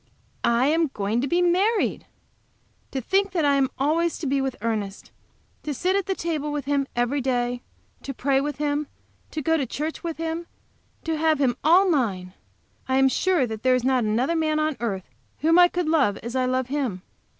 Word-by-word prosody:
I 235 Hz, +2 st, +3 dB
am 320 Hz, +3 st, +2 dB
going 210 Hz, +3 st, 0 dB
to 275 Hz, -, -1 dB
be 350 Hz, +4 st, +2 dB
married! 390 Hz, +6 st, +1 dB, 0.8 s
To 265 Hz, -, -3 dB
think 390 Hz, -, +1 dB
that 330 Hz, -5 st, +1 dB
I 285 Hz, -, +4 dB
am 270 Hz, -2 st, +2 dB
always 320 Hz, +5 st, +1 dB
to 330 Hz, -, -6 dB
be 275 Hz, 0 st, +1 dB
with 265 Hz, -1 st, -2 dB
Ernest! 210 Hz, -3 st, -3 dB, 0.5 s
To 295 Hz, -2 st, -4 dB
sit 370 Hz, +7 st, 0 dB
at 395 Hz, -2 st, 0 dB
the 385 Hz, -, 0 dB
table 310 Hz, -4 st, -2 dB
with 295 Hz, -2 st, -3 dB
him 280 Hz, -1 st, 0 dB
every 245 Hz, +4 st, 0 dB
day, 245 Hz, -1 st, -1 dB, 0.4 s
to 275 Hz, -, -5 dB
pray 270 Hz, +1 st, +1 dB
with 295 Hz, 0 st, -3 dB
him, 295 Hz, 0 st, -1 dB, 0.4 s
to 310 Hz, -, -5 dB
go 325 Hz, +2 st, +2 dB
to 280 Hz, -, -1 dB
church 305 Hz, +8 st, -4 dB
with 335 Hz, -2 st, -4 dB
him, 330 Hz, +1 st, -3 dB, 0.6 s
to 325 Hz, -1 st, -1 dB
have 315 Hz, -1 st, +3 dB
him 255 Hz, -4 st, +2 dB
all 355 Hz, +6 st, +5 dB
mine! 200 Hz, -, 0 dB, 0.5 s
I 260 Hz, 0 st, +1 dB
am 270 Hz, 0 st, +5 dB
sure 360 Hz, 0 st, +2 dB
that 220 Hz, -2 st, -6 dB
there 255 Hz, 0 st, +3 dB
is 250 Hz, -, -1 dB
not 260 Hz, -1 st, +2 dB
another 235 Hz, +9 st, +1 dB
man 310 Hz, -1 st, +1 dB
on 310 Hz, -1 st, 0 dB
earth 200 Hz, -6 st, -3 dB, 0.3 s
whom 325 Hz, +3 st, +4 dB
I 355 Hz, -, +8 dB
could 355 Hz, -2 st, -2 dB
love 280 Hz, -11 st, +2 dB
as 235 Hz, +2 st, -5 dB
I 255 Hz, -1 st, +2 dB
love 255 Hz, 0 st, 0 dB
him. 255 Hz, -9 st, -3 dB
280 Hz, 205 wpm, -24 LUFS, 250-325 Hz, 0.8 s, I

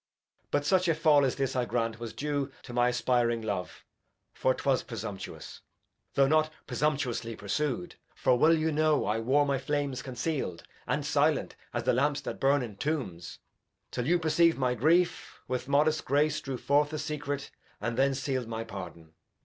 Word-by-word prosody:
Edg. -, -, -48 dB
But 145 Hz, 0 st, 0 dB
such 185 Hz, +3 st, +3 dB
a 165 Hz, -, +3 dB
Fall 150 Hz, -2 st, +5 dB
as 130 Hz, -, +1 dB
this 135 Hz, -1 st, -1 dB
I 125 Hz, -, +2 dB
grant 115 Hz, 0 st, -1 dB
was 115 Hz, -1 st, -5 dB
due 145 Hz, -1 st, -2 dB
To 120 Hz, -, -9 dB
my 120 Hz, 0 st, +3 dB
aspiring 120 Hz, -2 st, +1 dB
Love, 100 Hz, -4 st, -4 dB, 0.5 s
for 130 Hz, 0 st, +1 dB
'twas 135 Hz, -3 st, +1 dB
presumptuous, 105 Hz, -4 st, -7 dB, 0.5 s
Though 135 Hz, -, +5 dB
not 155 Hz, +1 st, +3 dB, 0.2 s
presumtuously 130 Hz, -6 st, -1 dB
pursu'd; 150 Hz, -, -2 dB, 0.2 s
For 125 Hz, -, +3 dB
well 155 Hz, +6 st, +5 dB
you 160 Hz, 0 st, 0 dB
know 155 Hz, 0 st, +2 dB
I 105 Hz, +2 st, 0 dB
wore 135 Hz, +6 st, +3 dB
my 140 Hz, -2 st, 0 dB
Flames 140 Hz, -1 st, -2 dB
conceal'd, 130 Hz, -, -3 dB, 0.2 s
And -, -, -1 dB
silent -, -, +1 dB, 0.2 s
as -, -, -2 dB
the -, -, +2 dB
Lamps 140 Hz, +3 st, +1 dB
that -, -, -5 dB
burn 140 Hz, 0 st, +3 dB
in 105 Hz, -5 st, -8 dB
Tombs 110 Hz, -, -3 dB, 0.5 s
'Till 125 Hz, +1 st, -2 dB
you 175 Hz, +2 st, +4 dB
perceiv'd 165 Hz, 0 st, +3 dB
my 130 Hz, -2 st, +1 dB
Grief, 165 Hz, +8 st, +1 dB
with 130 Hz, 0 st, -3 dB
modest 150 Hz, +2 st, +2 dB
Grace 150 Hz, +2 st, +1 dB
Drew 135 Hz, -3 st, -4 dB
forth 145 Hz, +4 st, +2 dB
the 155 Hz, -, -4 dB
Secret, 145 Hz, -2 st, -4 dB, 0.3 s
and 115 Hz, +3 st, -2 dB
then 135 Hz, +2 st, +2 dB
seal'd 130 Hz, -3 st, -2 dB
my 115 Hz, 0 st, -4 dB
Pardon. 85 Hz, -6 st, -9 dB
135 Hz, 175 wpm, -29 LUFS, 120-150 Hz, 0.5 s, Fall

